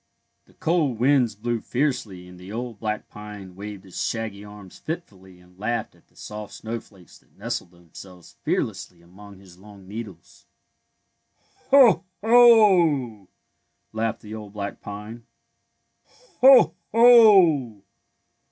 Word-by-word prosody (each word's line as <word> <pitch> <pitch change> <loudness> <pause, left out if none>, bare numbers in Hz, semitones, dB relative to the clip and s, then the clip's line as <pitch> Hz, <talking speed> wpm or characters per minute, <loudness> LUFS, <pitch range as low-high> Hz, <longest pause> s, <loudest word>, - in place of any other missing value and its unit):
The - - -26
cold 155 -7 0
winds 125 -3 +2
blew 115 +2 -3
fiercely 120 -10 -3
and 90 0 -14
the 90 +2 -11
old 115 -1 -6
black 110 -1 -4
pine 105 -3 -11
waved 100 0 -9
his 95 -2 -6
shaggy 110 -3 -4
arms 105 -2 -13
fitfully 95 - -9
and 90 +1 -23
laughed 120 +3 -3
at - - -27
the - - -35
soft 105 -1 -9
snowflakes 110 -5 -10
that - - -33
nestled - - -5
themselves 85 +1 -15
fearlessly 85 -1 -4
among 100 +3 -15
his 95 -2 -18
long 100 -1 -16
needles. 100 -5 -11 1.2
'^ - - -35
Ho! 255 -10 +6 0.2
Ho! 185 - +4 0.3
'' - - -50
laughed 110 0 -3
the 105 0 -11
old 105 -2 -9
black 100 -1 -6
pine. 105 +3 -10 0.5
'' - - -50 0.4
Ho! 250 - +7 0.2
Ho! 190 - +5
105 Hz, 135 wpm, -23 LUFS, 95-140 Hz, 1.2 s, Ho